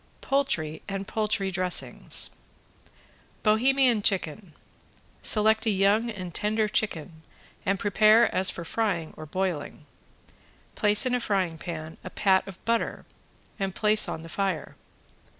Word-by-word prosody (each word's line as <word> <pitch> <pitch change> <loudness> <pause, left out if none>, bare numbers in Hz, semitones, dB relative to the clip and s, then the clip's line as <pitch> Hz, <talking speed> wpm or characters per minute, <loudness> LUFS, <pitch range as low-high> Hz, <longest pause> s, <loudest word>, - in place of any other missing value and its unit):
POULTRY 170 - -1
AND 195 0 -5
POULTRY 210 -3 -1
DRESSINGS 180 0 0 1.1
~BOHEMIAN 245 +1 +3
CHICKEN~ 190 -2 -1 0.7
Select 220 +1 +4
a - - +4
young 205 +3 +2
and 185 -6 -7
tender 215 +3 0
chicken 165 -6 -3 0.5
and 195 +1 +2
prepare 215 +3 +4
as 185 0 +4
for 170 - -6
frying 175 -5 -2
or 155 - -10
broiling. 170 -4 -4 0.9
Place 210 +3 +3
in 255 - 0
a 250 - +1
frying 185 -8 -1
pan 160 -2 -7
a 185 - -7
pat 190 0 +1
of 190 -2 -12
butter 230 0 -1 0.5
and 195 -2 -3
place 215 0 +4
on 160 - -5
the - - -9
fire. 190 -2 -3
195 Hz, 130 wpm, -26 LUFS, 175-215 Hz, 1.1 s, Select